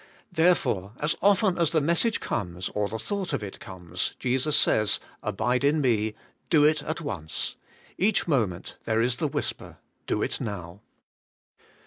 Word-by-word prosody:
Therefore, 160 - +2
as 150 +2 0
often 195 -2 +3
as 170 -3 +4
the 160 - +2
message 170 +9 +2
comes, 90 -1 -3
or 105 -1 -1
the 110 - -3
thought 190 - -3
of 125 -6 -1
it 100 - -7
comes, 90 -2 -4
Jesus 130 +4 +1
says. 105 -2 +4 0.2
Abide 110 +5 0
in 145 +2 +3
me: 110 -5 +1 0.3
do 155 -4 +5
it 150 0 +4
at 155 +3 -4
once. 85 - -3 0.5
Each 200 0 +2
moment 110 - -1
there 110 0 +1
is 125 0 +1
the - - 0
whisper. - - -4 0.3
Do - - 0
it - - -2
now. 100 -3 -6
125 Hz, 155 wpm, -27 LUFS, 100-160 Hz, 0.5 s, do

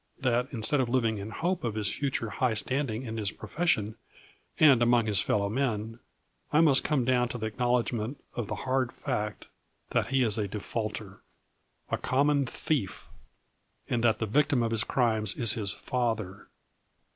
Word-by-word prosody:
That, 125 -1 +1
instead 130 +4 0
of 125 - -1
living 115 -4 +1
in 100 +2 -6
hope 175 - -2
of 115 -3 -2
his 105 -2 -1
future 130 -6 -2
high 125 -4 0
standing 125 0 -1
in 115 -1 -5
his 105 -2 -1
profes 175 +3 -4
sion 110 -6 +1 0.6
and 140 -6 +7
among 120 -1 +4
his 105 -4 +2
fellow 100 0 +1
men, 115 -1 -2 0.5
I 150 - +4
must 145 -5 +5
come 140 -5 +1
down 125 -1 +2
to 120 - -4
the 110 -1 -3
acknowldgment 120 0 0 0.2
of 120 -4 -3
the - - -3
hard 130 -2 +1
fact 105 0 -3 0.5
that - - +1
he 135 +1 +2
is 110 -2 +1
a 105 - 0
defaulter, 105 -1 -5 0.7
a - - 0
common 140 +1 +2
thief, 120 -7 -2 0.8
and 120 -1 -1
that 115 -2 +4
the 110 - -1
victim 135 +2 +2
of 115 - -1
his 110 -1 +2
crimes 110 -5 +1
is 115 -3 +3
his 100 -4 -1
father. 110 -6 -3
115 Hz, 170 wpm, -29 LUFS, 110-130 Hz, 0.8 s, and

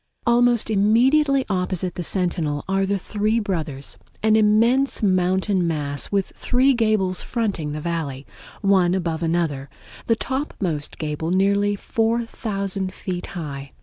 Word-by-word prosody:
Almost 240 -1 +3
immediately 260 +7 +3
opposite 185 -2 -1
the - - -5
Sentinel 170 -5 -1
are 195 0 +1
the 200 +1 +1
Three 215 +4 0
Brothers, 155 -9 -3 0.2
an 220 0 +4
immense 225 +5 +3
mountain 185 -1 +2
mass 145 -3 -2
with 200 -2 0
three 260 +2 +2
gables 215 -6 +1
fronting 200 -10 -2
the 150 +1 -4
Valley, 150 -5 -3 0.4
one 190 -3 +3
above 165 -3 -2
another, 160 -5 -1 0.4
the 230 - +4
topmost 200 - -3
gable 155 +1 -3
nearly 200 +2 +2
4000 205 -4 -2
feet 180 -2 -5
high. 140 -4 -6
190 Hz, 125 wpm, -22 LUFS, 170-220 Hz, 0.4 s, an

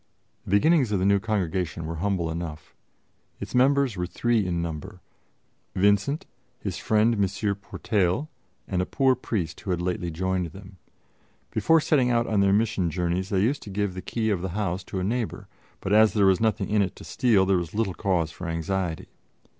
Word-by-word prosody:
The - - -9
beginnings 130 - +4
of 100 - +2
the 95 - 0
new 100 0 +4
Congregation 95 -6 -2
were 80 +1 -4
humble 90 -2 -1
enough. 80 -2 -6 0.7
Its - - -7
members 135 -1 +3
were 90 -1 -2
three 110 +2 0
in 85 -1 -1
number: 85 +3 -5 0.8
Vincent, 105 +10 +2 0.3
his - - -4
friend 110 +2 +2
M. 105 - -1 0.4
Portail, 100 - -1 0.4
and 90 -2 0
a 90 - -2
poor 135 -1 +3
priest 95 -10 -3
who - - -7
had 90 -2 0
lately 90 0 -2
joined 90 +2 -1
them. 95 -1 -12 0.7
Before 165 0 +4
setting 140 -5 +2
out 120 -1 +2
on 110 -3 0
their 100 0 +4
mission 105 -4 +1
journeys 90 +3 -1
they 95 -2 +1
used 130 +8 +1
to - - -9
give 100 -1 -1
the 95 - -6
key 110 +1 -1
of 95 -4 0
the 95 - -3
house 95 -2 -1
to 95 - -4
a - - -2
neighbor; 115 +3 -2 0.3
but 95 - -1
as 110 0 +6
there 105 -2 +3
was 95 0 +4
nothing 110 -3 +1
in 105 -1 +3
it 95 -2 -1
to - - -12
steal, 110 -7 +2
there 95 -1 +3
was 85 +2 -4
little 105 -4 0
cause 85 -3 0
for 90 - -7
anxiety. 85 0 -2
95 Hz, 195 wpm, -26 LUFS, 90-110 Hz, 0.8 s, as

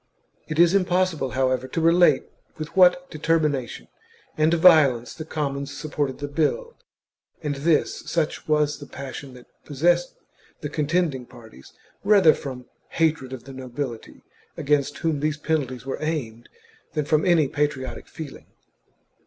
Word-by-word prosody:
It 155 - -4
is 170 +1 +5
impossible, 180 -6 +1
however, 130 0 +1
to 130 - -3
relate 170 +2 +4 0.3
with 155 +3 -7
what 180 -1 +4
determina 155 -5 +1
tion - - -10 0.5
and 155 +1 +2
violence 155 -8 +5
the 155 - -8
commons 140 -2 -4
supported 145 -3 -3
the 145 - -5
bill, 465 - -1 0.7
and 150 -1 -1
this, 155 +3 +1
such 165 -3 -2
was 150 -1 +1
the 145 - -10
passion 135 0 -8
that 125 - -14 0.2
possessed 170 +5 +1 0.5
the 150 - -4
contending 150 -4 -1
parties, 110 - -15 0.3
rather 200 -6 +6
from 130 -4 -7 0.2
hatred 160 -5 0
of 130 -3 -7
the 135 +1 -11
nobility, 130 -2 -6 0.3
against 145 0 0
whom 160 -3 -1
these 155 +1 -1
penalties 135 -6 -2
were 135 - -4
aimed, 130 -8 -4 0.4
than 150 -2 -1
from 155 +1 +2
any 170 -5 +4
patriotic 140 -2 -3
feeling. 155 -3 -9
150 Hz, 140 wpm, -24 LUFS, 135-165 Hz, 0.7 s, rather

